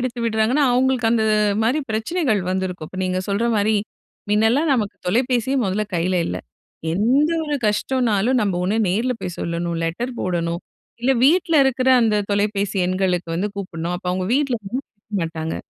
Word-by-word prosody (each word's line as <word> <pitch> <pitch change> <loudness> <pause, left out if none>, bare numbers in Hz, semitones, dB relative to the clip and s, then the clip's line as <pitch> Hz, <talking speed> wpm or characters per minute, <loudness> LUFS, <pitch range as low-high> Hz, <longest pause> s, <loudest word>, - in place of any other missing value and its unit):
எடுத்து 250 0 -3
விடுறாங்கன்னா, 230 +6 +2
அவங்களுக்கு 255 -1 +2
அந்த 225 -1 +2 0.4
மாரி 250 +7 +2
பிரச்சனைகள் 225 - 0
வந்திருக்கும். 185 -4 -3
இப்ப 185 - -9
நீங்க 185 0 -1
சொல்ற 200 +4 +1
மாரி, 210 +1 +2 0.6
முன்னலாம் 225 +9 +3
நமக்கு 215 -6 -1
தொலைபேசியே 245 +5 +1
மொதல்ல 200 +2 0
கையில 180 +2 +1
இல்ல. - - -3 0.6
எந்த 250 - +2
ஒரு 295 -1 -1
கஷ்டம்னாலும் 235 +1 +1
நம்ம 200 -3 0
ஒண்ணு 200 +4 0
நேர்ல 230 +8 +1
போய் 180 - -5
சொல்லணும், 170 0 -2
லெட்டர் 235 +10 -3
போடணும், 170 -1 -1 0.4
இல்ல 260 +3 +3
வீட்ல 335 +2 +3
இருக்குற 260 -1 +1
அந்த 220 -2 +2 0.2
தொலைபேசி 205 0 0
எண்களுக்கு 185 -2 0
வந்து 190 +5 -1
கூப்டணும். 175 -3 -4
அப்போ 180 0 -6
அவங்க 185 0 -2
வீட்ல 275 -3 +1
வந்து 220 +7 -3
குடுக்க 205 -1 -7
மாட்டாங்க. 160 -1 -3
215 Hz, 155 wpm, -21 LUFS, 185-250 Hz, 0.6 s, முன்னலாம்